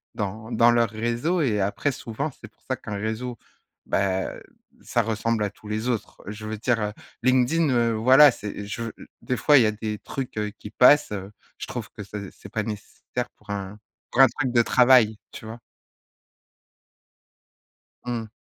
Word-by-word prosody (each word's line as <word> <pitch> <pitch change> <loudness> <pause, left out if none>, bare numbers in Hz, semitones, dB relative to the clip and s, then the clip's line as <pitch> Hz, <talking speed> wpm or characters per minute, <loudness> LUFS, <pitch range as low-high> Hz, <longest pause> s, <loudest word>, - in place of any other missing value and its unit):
dans 110 +2 -4
dans 115 +1 +5
leurs 120 -1 +3
réseaux 120 - -1
et 115 -8 +1
après 100 +8 0
souvent, 125 +3 -4
c'est 110 - -10
pour - - -40
ça 130 - +1
qu'un 105 -4 -7
réseau, 110 +4 -3 0.5
bah 95 -1 0 0.5
ça 120 - 0
ressemble 110 0 -1
à 105 - 0
tous 105 +1 -16
les 110 +3 -2
autres. 115 -4 -3
Je 105 +1 -7
veux 110 0 -4
dire 110 -2 0 0.3
LinkedIn, 130 +6 +3
heu, 120 -2 +2
voilà, 130 +6 +7
c'est 105 -2 -7
je 105 +3 -5 0.4
des 125 - -2
fois 145 +6 +5
il 130 - +6
y - - +3
a 110 - +2
des 105 0 -5
trucs, 130 -4 -6
heu, 105 0 -1
qui 105 - -8
passent, 135 +4 +5
heu, 100 -1 -5 0.3
je - - -6
trouve - - -5
que - - -10 0.3
c'est 100 - -13
pas 105 +1 -2
nécessaire 105 -1 -5
pour - - -25
un 100 0 -5 0.3
pour 130 - +4
un 135 - +9
truc 130 +1 -2
de 120 - +6
travail, 120 -3 +5
tu - - -10
vois? 110 +2 -8 2.5
Mmh. 120 -2 -3
115 Hz, 175 wpm, -25 LUFS, 105-125 Hz, 2.5 s, un